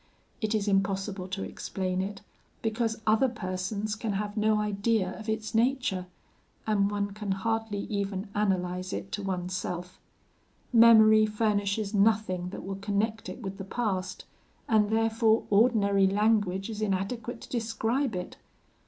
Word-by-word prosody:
It 220 0 0
is 210 -1 -1
impossible 195 -1 0
to 190 +1 -4
explain 185 -1 -3
it, 195 +1 -5 0.4
because 225 0 -1
other 220 +5 +4
persons 200 0 -3
can 215 -1 -3
have 205 +1 -3
no 215 0 +2
idea 210 -2 0
of 220 0 -7
its 220 0 -2
nature; 225 -6 +1 0.6
and 200 -2 +2
one 205 0 -2
can 205 -1 -3
hardly 220 0 -2
even 200 -1 -3
analyse 185 -2 -1
it 195 - -5
to 205 - -3
oneself. 180 -1 -4 0.7
Memory 220 -2 +7
furnishes 210 -1 0
nothing 200 -4 +2
that - - -7
will 195 0 -5
connect 210 +3 -1
it 245 - -8
with 195 0 -6
the - - -4
past, 195 -3 -3 0.4
and 215 -5 +3
therefore 225 0 +2
ordinary 200 -3 +4
language 205 -2 +1
is 215 -1 -6
inadequate 215 +4 -2
to - - -11
describe 230 +1 -1
it. 180 0 -5
205 Hz, 140 wpm, -28 LUFS, 195-220 Hz, 0.7 s, Memory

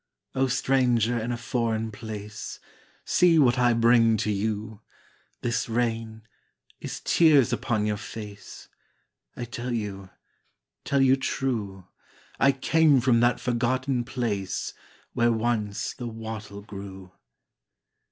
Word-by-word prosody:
O 135 0 +1
stranger 125 -3 +2
in 115 +2 -3
a 120 - -2
foreign 115 -2 -1
place, 105 0 -7 0.5
See 175 -2 +4
what 125 -5 +4
I 120 -1 +4
bring 115 -1 +4
to 105 0 -1
you. 105 +1 -3 0.6
This 120 0 -1
rain 115 -1 -2 0.6
is - - -6
tears 150 -7 +4
upon 110 -4 0
your 105 -1 0
face; 105 -3 -9 0.7
I 120 - -4
tell 120 +1 -5
you 100 -4 -4 0.8
tell 140 -1 +2
you 135 0 +5
true 110 -9 -3 0.5
I 140 - +5
came 145 +1 +3
from 120 -1 +3
that 120 +1 +3
forgotten 125 +1 0
place 115 -6 -3 0.4
Where 120 0 +3
once 110 -3 -1
the 120 -2 -6
wattle 110 -2 -7
grew. 95 -2 -9
115 Hz, 120 wpm, -26 LUFS, 105-125 Hz, 0.8 s, you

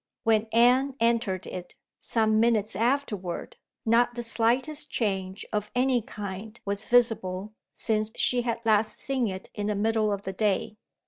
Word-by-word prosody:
When 225 0 +2
Anne 250 +4 +4
entered 230 -5 +1
it, 180 -1 -8 0.2
some 220 -1 +2
minutes 220 -3 +2
afterward, 225 -6 -2 0.3
not 240 +2 +3
the 240 - -1
slightest 245 +7 +1
change 195 -3 -2
of 210 0 -1
any 250 -1 +2
kind 210 +1 -7
was 200 +1 -3
visible 215 -5 +1 0.2
since 215 -1 -1
she 250 -1 +3
had 230 -1 -3
last 215 -1 +2
seen 265 -4 -1
it 190 -1 -7
in 205 -1 -3
the 210 - 0
middle 215 +1 +1
of 200 0 -3
the 190 - -4
day. 210 +1 -1
220 Hz, 150 wpm, -27 LUFS, 205-235 Hz, 0.3 s, Anne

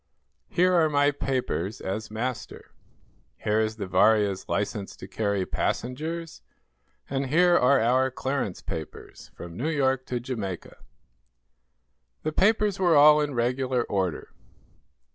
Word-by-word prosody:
Here 180 +1 +2
are 165 -3 +4
my 145 -1 +3
papers, 130 -8 -2
as 105 +3 -4
master. 120 +3 -5 0.7
Here 105 +1 0
is 110 0 0
the 105 -3 -5
'Varia's' 100 +1 +2
license 100 -1 -2
to - - -10
carry 100 -2 -1
passengers, 160 - -3 0.7
and 135 0 -2
here 175 +5 +4
are 135 -2 +4
our 130 +3 +2
clearance 130 -6 -3
papers, 80 -2 -8
from 85 -1 -9
New 135 - -2
York 135 -4 0
to 125 - -2
Jamaica." 110 -8 -6 1.5
The 155 - -1
papers 205 +2 +2
were 175 -4 +4
all 150 +1 +7
in 145 -2 -2
regular 125 +1 0
order. 95 -7 -2
125 Hz, 125 wpm, -26 LUFS, 105-150 Hz, 1.5 s, all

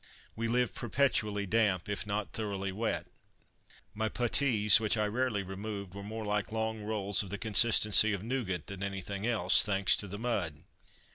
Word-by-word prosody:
We 115 +1 -2
lived 125 +1 0
perpetually 110 -5 0
damp, 100 -2 +1
if 105 0 -4
not 105 0 -3
thoroughly 100 -3 -3
wet. 110 +4 -2 0.9
My 110 +1 -1
puttees, 115 -3 +3
which 110 0 0
I 105 - +1
rarely 110 -1 -1
removed, 100 0 -7
were 100 - -8
more 110 +2 -6
like 105 0 -2
long 110 0 -3
rolls 105 -2 0
of 100 - -8
the 100 - -4
consistency 110 0 +5
of 100 -2 -3
nougat 110 - -3
than 100 -1 -9
anything 100 +1 -4
else, 105 -7 +5
thanks 95 -2 +2
to 100 - -3
the 100 +2 -7
mud. 100 -11 -3
105 Hz, 165 wpm, -31 LUFS, 100-110 Hz, 0.9 s, consistency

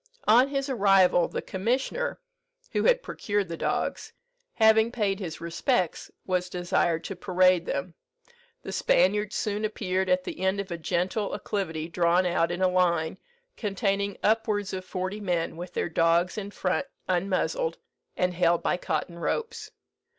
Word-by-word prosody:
On 245 +4 +6
his 275 0 -2
arrival, 195 -8 +4
the - - -5
commissioner 255 - -1 0.5
(who - - 0
had - - +4
procured 205 -3 -2
the 165 - -3
dogs), - - -2 0.4
having 220 0 +5
paid 205 -5 0
his 175 -5 -5
respects, 170 - -1 0.2
was 180 -1 -1
desired 175 -2 0
to 195 - -5
parade 185 -1 +3
them. 165 +5 -3 0.7
The - - -6
Spaniards 205 +4 +2
soon 210 0 -1
appeared 190 -3 -1
at 180 0 +2
the - - -6
end 190 +1 +1
of 200 -2 -5
a 170 - -2
gentle 185 +5 -1
acclivity 165 -6 -3
drawn 175 +1 +2
out 170 -1 +1
in 175 +2 -2
a - - +5
line, 175 -2 +1 0.4
containing 200 -1 -1
upwards 210 -2 +1
of 185 -1 -4
forty 185 +2 -4
men, 175 -5 -1
with 175 +2 -8
their - - 0
dogs 165 +2 +2
in 205 -2 -5
front 200 +6 -1 0.2
unmuzzled, 195 - 0 0.4
and 180 0 +1
held 170 -1 +2
by - - +1
cotton 170 +1 -3
ropes. 455 - -3
185 Hz, 150 wpm, -27 LUFS, 175-210 Hz, 0.7 s, On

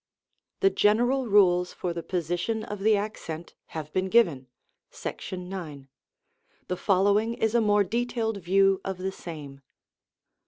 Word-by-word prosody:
The 390 -1 +5
general 245 - +2
rules 180 -4 +4
for 175 -2 -3
the 170 - -4
position 180 +6 -2
of 210 -1 -6
the 215 +1 +3
accent 175 -6 -5 0.2
have 155 -1 -6
been 190 0 0
given 170 - +3 0.4
(§9). 180 -7 -6 0.8
The 180 - -1
following 205 +4 +2
is 220 -1 0
a 235 - +4
more 205 -1 +4
de 235 +5 -1
tailed 225 -3 -2
view 195 +1 +3
of 190 -1 -4
the 190 +1 -3
same. 150 -7 -9
195 Hz, 140 wpm, -27 LUFS, 175-220 Hz, 0.8 s, The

